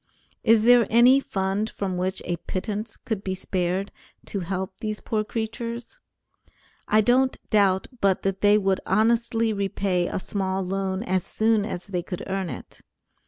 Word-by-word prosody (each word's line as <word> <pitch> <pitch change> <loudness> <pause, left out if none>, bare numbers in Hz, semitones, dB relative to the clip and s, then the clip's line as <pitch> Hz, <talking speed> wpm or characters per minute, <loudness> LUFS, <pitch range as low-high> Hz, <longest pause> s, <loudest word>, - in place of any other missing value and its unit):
Is 225 -1 +5
there 240 0 +6
any 245 +4 +6
fund 195 -2 -2
from 190 -3 -3
which 185 +1 -2
a 175 - -2
pittance 210 +5 -4
could 215 -4 -4
be 190 -1 -2
spared 185 +1 -2 0.3
to 200 - -4
help 190 +1 -4
these 215 -2 -3
poor 215 -1 -1
creatures? 230 - -5 0.9
I 215 +1 +4
don't 255 +4 +3
doubt 195 -3 +3
but 195 -3 +2
that 195 -1 -1
they 205 0 +6
would 195 -2 +1
honestly 225 +2 +2
repay 195 -3 0
a - - -3
small 190 0 -2
loan 190 +1 -2
as 185 -4 0
soon 220 -1 +1
as 180 -5 -5
they 185 -3 -2
could 180 0 -6
earn 190 -2 -2
it. - - -9
200 Hz, 160 wpm, -25 LUFS, 190-220 Hz, 0.9 s, there